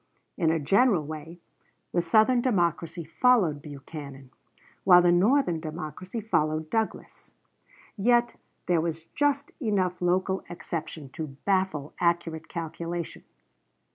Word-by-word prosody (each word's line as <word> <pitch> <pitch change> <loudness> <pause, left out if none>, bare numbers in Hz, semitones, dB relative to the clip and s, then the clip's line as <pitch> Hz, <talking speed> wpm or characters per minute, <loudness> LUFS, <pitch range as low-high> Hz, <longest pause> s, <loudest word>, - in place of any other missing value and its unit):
In 165 -4 +1
a 165 - +2
general 185 - +3
way 155 +2 -8 0.5
the 175 - +2
Southern 220 +8 +4
Democracy 170 -7 0
followed 170 - +2
Buchanan, 140 -2 -9 0.5
while 180 -2 +7
the 175 - +5
Northern 185 - +3
Democracy 160 - -6
followed 155 -7 0
Douglas. 225 -1 -3 0.7
Yet 240 +3 +2 0.3
there 175 -2 +2
was 165 -1 -3
just 290 0 +1
enough 190 -7 0
local 185 +2 +1
exception 160 -4 -6
to 160 +3 -5 0.2
baffle 185 -7 0
accurate 170 -2 0
calculation. 170 0 -5
175 Hz, 110 wpm, -27 LUFS, 160-200 Hz, 0.7 s, while